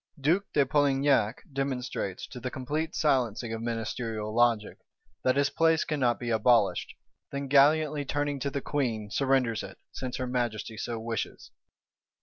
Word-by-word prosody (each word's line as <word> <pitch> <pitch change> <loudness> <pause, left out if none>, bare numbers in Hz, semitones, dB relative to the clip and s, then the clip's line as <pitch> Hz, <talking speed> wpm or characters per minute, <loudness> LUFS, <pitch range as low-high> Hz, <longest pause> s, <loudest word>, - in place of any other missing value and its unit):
Duke 170 +8 +1
de 140 - +4
Polignac 135 -5 +2
demonstrates, 130 -8 -3
to 125 - -8
the 130 +1 -3
complete 150 +6 -3
silencing 120 -5 +1
of 115 - -4
ministerial 115 -1 -3
logic, 115 -2 +2 0.4
that 130 - +3
his 140 0 +2
place 165 -1 +3
cannot 130 -6 0
be 120 -1 -3
abolished; 115 -2 +2 0.4
then 140 0 -3
gallantly, 145 +2 +4
turning 145 0 -1
to 140 - -1
the 140 0 -3
Queen, 115 -9 -2
surrenders 130 -5 +1
it, - - -9
since 130 -1 -5
her 130 - -2
Majesty 120 -3 -2
so 115 +1 -4
wishes. 115 -1 -4
130 Hz, 145 wpm, -28 LUFS, 115-140 Hz, 0.4 s, de